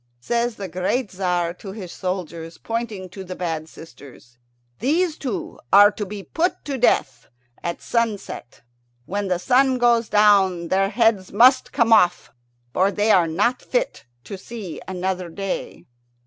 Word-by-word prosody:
Says 235 - -1
the 200 -2 -6
great 185 +7 -1
Tzar 180 -2 -1
to 195 -2 -8
his 190 -5 -8
soldiers, 170 -3 -5
pointing 225 -5 -4
to 190 +2 -9
the 185 0 -7
bad 160 -3 -4
sisters, 130 -7 -15 0.4
"These 315 - +1
two 260 -7 -5
are 205 +1 +8
to 210 -1 -5
be 200 0 -7
put 340 - -2
to 275 -3 -3
death 135 - +1 0.3
at 170 0 -4
sunset. 220 - -3 0.4
When 200 +4 -3
the 180 -1 +1
sun 260 +7 +3
goes 240 -2 +3
down 195 -5 +4
their 195 +1 +2
heads 220 -3 +1
must 255 +5 +5
come 230 -1 +3
off, 180 -5 +3 0.4
for 190 +2 +3
they 210 +2 +1
are 175 -4 +4
not 205 +10 0
fit - - -2 0.2
to 190 +8 -8
see 210 -6 -8
another 185 -1 -3
day." 195 +3 -5
195 Hz, 150 wpm, -22 LUFS, 180-230 Hz, 0.4 s, are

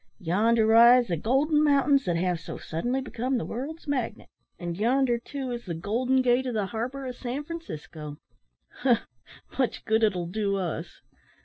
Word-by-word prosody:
Yonder 220 +5 +2
rise 235 +3 +7
the 170 - +1
golden 280 - +2
mountains 280 -1 +3
that 175 - 0
have 175 0 0
so 165 - -7
suddenly 245 +12 -2
become 255 0 -2
the - - -3
world's 300 +8 -6
magnet; 265 -5 -3 0.3
and 175 -1 -4
yonder, 245 +1 +2
too, 265 +1 -5
is 240 0 -5
the 170 -3 -4
`Golden 245 +9 +1
Gate' 250 +1 +2
of 245 - -3
the 210 -2 0
harbour 245 +6 -4
of 250 -1 -5
San 255 +4 -4
Francisco. 155 - -8 0.6
Humph! 245 -3 +2 0.5
much 255 -4 0
good 220 +1 +2
it'll 190 -6 +1
do 200 +2 -1
us." 180 -4 -4
240 Hz, 170 wpm, -27 LUFS, 200-265 Hz, 0.6 s, rise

